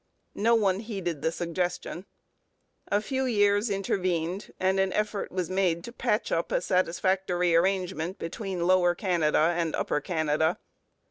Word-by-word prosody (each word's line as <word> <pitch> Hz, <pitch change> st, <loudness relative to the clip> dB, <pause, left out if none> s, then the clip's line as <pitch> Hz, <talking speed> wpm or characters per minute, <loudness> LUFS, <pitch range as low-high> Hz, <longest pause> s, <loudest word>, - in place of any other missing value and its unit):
No 230 Hz, +3 st, +3 dB
one 195 Hz, -4 st, +2 dB
heeded 190 Hz, -9 st, -4 dB
the 160 Hz, -, +1 dB
suggestion. 175 Hz, +2 st, -3 dB, 0.8 s
A 205 Hz, +1 st, +1 dB
few 265 Hz, +2 st, -1 dB
years 205 Hz, -2 st, +2 dB
intervened, 185 Hz, -2 st, -1 dB
and 190 Hz, +1 st, +2 dB
an 190 Hz, 0 st, +2 dB
effort 210 Hz, -1 st, -2 dB
was 185 Hz, -2 st, -2 dB
made 180 Hz, -2 st, 0 dB
to 235 Hz, -, -7 dB
patch -, -, -1 dB
up -, -, -1 dB
a -, -, +2 dB
satisfactory 180 Hz, -, +1 dB
arrangement 185 Hz, 0 st, 0 dB
between 180 Hz, 0 st, -4 dB
Lower 180 Hz, -1 st, +4 dB
Canada 170 Hz, -3 st, +2 dB
and 170 Hz, -2 st, -1 dB
Upper 150 Hz, -, -1 dB
Canada. 160 Hz, 0 st, 0 dB
185 Hz, 140 wpm, -27 LUFS, 170-195 Hz, 0.8 s, Lower